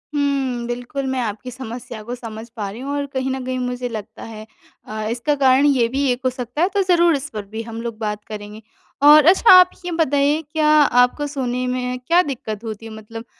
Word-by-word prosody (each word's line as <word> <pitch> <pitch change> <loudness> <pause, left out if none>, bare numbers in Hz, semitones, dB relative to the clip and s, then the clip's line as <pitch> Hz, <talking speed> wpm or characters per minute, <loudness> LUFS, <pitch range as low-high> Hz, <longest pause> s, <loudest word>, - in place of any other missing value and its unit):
हुँ. 270 -4 -1
बिल्कुल, 245 +3 -4
मैं 260 0 -1
आपकी 225 +2 -5
समस्या 235 -2 -8
को 240 +3 -5
समझ 225 -2 -9
पा 205 -4 -4
रही 210 +4 -9
हूँ 275 +2 -5
और 285 0 -2
कहीं 260 0 -1
न 265 0 -4
कहीं 255 0 -2
मुझे 250 0 -3
लगता 220 -1 -8
है 220 -1 -9 0.4
अ, 215 0 -5
इसका 245 +6 -1
कारण 270 0 +4
ये 265 -5 +3
भी 270 +4 -1
एक 245 +1 -3
हो - - +4
सकता 250 +3 -5
है, 360 - +3
तो 400 0 0
ज़रूर 345 -3 +3
इस 280 +2 -5
पर 210 -2 -5
भी 220 +3 -6
हम 230 0 -7
लोग 230 -2 -5
बात 210 -1 -4
करेंगे 210 0 -8 0.4
और 295 +1 +8
अच्छा, 375 +7 +6
आप 365 -1 +9 0.2
ये 355 - -3
बताइए, 295 -2 +1
क्या 310 -1 +1
आपको 290 -2 +4
सोने 255 -3 -3
में 250 0 -2
क्या 345 +2 +5
दिक्कत 235 - -5
होती 220 -1 -7
है, 225 - -8
मतलब 220 +1 -9
250 Hz, 220 wpm, -20 LUFS, 225-285 Hz, 0.4 s, आप